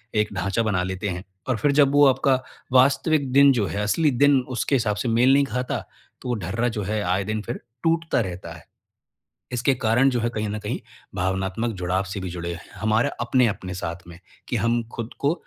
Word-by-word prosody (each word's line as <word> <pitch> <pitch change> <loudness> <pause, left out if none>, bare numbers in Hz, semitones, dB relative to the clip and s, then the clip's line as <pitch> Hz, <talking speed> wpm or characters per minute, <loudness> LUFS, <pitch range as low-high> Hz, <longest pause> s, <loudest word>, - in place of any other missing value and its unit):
एक 105 -1 +1
ढांचा 100 +5 0
बना 100 -5 0
लेते 95 +2 -3
हैं। 90 +1 -4 0.3
और 125 - +1
फिर 140 +6 +2
जब 140 -2 +5
वो 145 0 +6
आपका 135 +1 +3 0.4
वास्तविक 140 +2 +3
दिन 140 0 +7
जो 115 -5 +1
है, 100 - -3
असली 150 +8 +2
दिन 140 +2 +4 0.2
उसके 140 - +1
हिसाब 110 -5 +1
से 110 +4 -3
मेल 125 +4 +4
नहीं 140 0 +4
खाता, 125 +1 -2 0.4
तो 125 - -6
वो 120 - +1
ढर्रा 115 +7 -1
जो 105 - -1
है 105 +2 -1
आए 95 +2 0
दिन 110 +1 -2
फिर 120 +3 -5 0.2
टूटता 165 -2 +1
रहता 90 -3 -6
है। - - -13 0.9
इसके 125 +2 +1
कारण 125 +3 +3
जो 125 -2 0
है 120 - 0
कहीं 110 -2 -3
न 105 +1 -3
कहीं 105 - -4 0.4
भावनात्मक 95 +5 -1
जुड़ाव 90 +2 0
से 95 +1 -5
भी 95 - -5
जुड़े 85 0 -5
हैं, 85 - -9 0.2
हमारे 110 +1 +2
अपने-अपने 120 -7 +1
साथ 85 -1 -5
में। 85 +1 -12 0.3
कि 120 - -2
हम 115 +2 +1
खुद 115 0 -5
को 145 +3 +2
110 Hz, 210 wpm, -24 LUFS, 95-130 Hz, 0.9 s, दिन